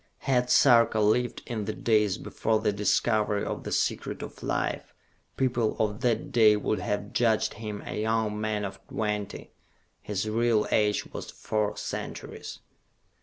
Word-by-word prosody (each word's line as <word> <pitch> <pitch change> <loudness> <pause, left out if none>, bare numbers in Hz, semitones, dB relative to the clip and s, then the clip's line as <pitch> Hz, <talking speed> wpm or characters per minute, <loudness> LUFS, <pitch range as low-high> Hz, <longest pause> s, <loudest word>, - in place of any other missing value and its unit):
Had 125 -2 +2
Sarka 115 -4 +5
lived 110 +4 +1
in 110 -4 -3
the 110 - -2
days 105 -3 +2
before 110 -1 -1
the 110 -1 +1
discovery 105 0 +1
of - - -4
the - - -5
Secret - - -1
of - - -9
Life, - - -2 0.4
people 120 -4 +1
of 105 +1 -1
that 120 +1 0
day 110 -4 +6
would 105 +1 -1
have 105 0 -3
judged 115 -3 +2
him 105 -2 -6
a - - -3
young 110 -1 0
man 105 -1 -1
of 95 0 -7
twenty. 105 -2 -3 0.5
His 105 0 -3
real 115 0 +2
age 105 -1 +2
was - - -6
four 105 -1 -2
centuries. - - -6
110 Hz, 150 wpm, -27 LUFS, 105-115 Hz, 0.5 s, day